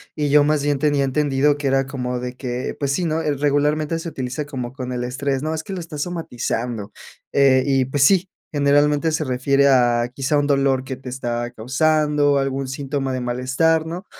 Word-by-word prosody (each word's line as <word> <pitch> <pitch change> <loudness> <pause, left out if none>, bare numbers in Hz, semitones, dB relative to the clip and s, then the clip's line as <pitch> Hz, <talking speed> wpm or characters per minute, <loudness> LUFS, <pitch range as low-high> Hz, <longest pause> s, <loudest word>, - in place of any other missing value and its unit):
y 150 -2 -1
yo 145 0 +5
más 150 -1 +1
bien 145 -1 0
tenía 145 -1 +2
entendido 145 +1 +1
que 145 -1 -2
era 135 0 +2
como 125 -2 -3
de 125 0 -6
que 125 -1 -4
pues 140 -1 0
sí, 180 - -1
¿no?, 160 0 0
regularmente 150 +2 0
se 165 - -6
utiliza 130 -1 -4
como 130 -4 -5
con 125 -2 -6
el 120 0 -3
estrés, 135 +2 -2
¿no?, 155 +1 -1
"es 160 - -4
que 195 - -7
lo 180 - -4
está 160 -2 -8
somatizando", 120 - -3 0.4
eh, 135 -2 +4
y 135 -2 +2
pues 135 +2 0
sí, 190 +3 +4 0.2
generalmente 145 +2 +2
se 155 0 -1
refiere 135 +2 +2
a 120 -2 +3
quizá 140 +2 0
un 145 - 0
dolor 135 -2 +2
que 130 -1 -4
te 130 0 -9
está 120 -1 -3
causando 145 +4 +1
algún 135 -1 -2
síntoma 135 0 -3
de 130 - -2
malestar, 130 +7 +1
¿no?, 175 +4 -6
140 Hz, 200 wpm, -21 LUFS, 130-150 Hz, 0.4 s, yo